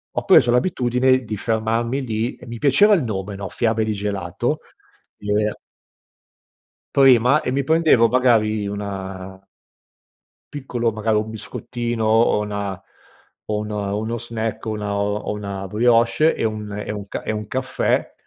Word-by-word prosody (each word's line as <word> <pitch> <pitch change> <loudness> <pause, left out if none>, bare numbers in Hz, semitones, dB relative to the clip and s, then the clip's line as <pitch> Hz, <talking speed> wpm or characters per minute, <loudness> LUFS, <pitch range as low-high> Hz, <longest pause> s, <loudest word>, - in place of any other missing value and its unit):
ho - - -2
preso 120 - +6
l'abitudine 130 -2 +2
di 110 -2 -5
fermarmi 115 +4 -1
lì 115 0 -2
e - - -14
mi 115 - -6
piaceva 150 +10 +5
il 165 - 0
nome 100 -3 -4
no, 95 -2 -6
Fiabe 110 -1 0
di 110 - -1
gelato 100 - -2 0.6
e 105 0 -5 1.6
Prima 135 +1 +5
e - - -2
mi 135 +1 -1
prendevo 160 -7 +4
magari 110 -4 +2
una 95 -1 -6 1.1
piccolo, 125 -5 -2
magari 110 0 0
un 110 +1 -2
biscottino 120 +1 -4
o 110 0 +3
una 100 -2 -4 0.7
o 105 - -1
un 105 - -5
uno 105 +3 -2
snack 115 -1 -4
o - - -2
una 105 -1 -3
o 105 +1 -1
una 100 -2 -5
brioche 115 - +3
e - - -3
un 105 -1 -3
e 105 +1 -5
un 105 -1 -6
ca - - -5
e - - -2
un 105 -1 -4
caffè, 130 +2 -1
110 Hz, 150 wpm, -21 LUFS, 105-120 Hz, 1.6 s, preso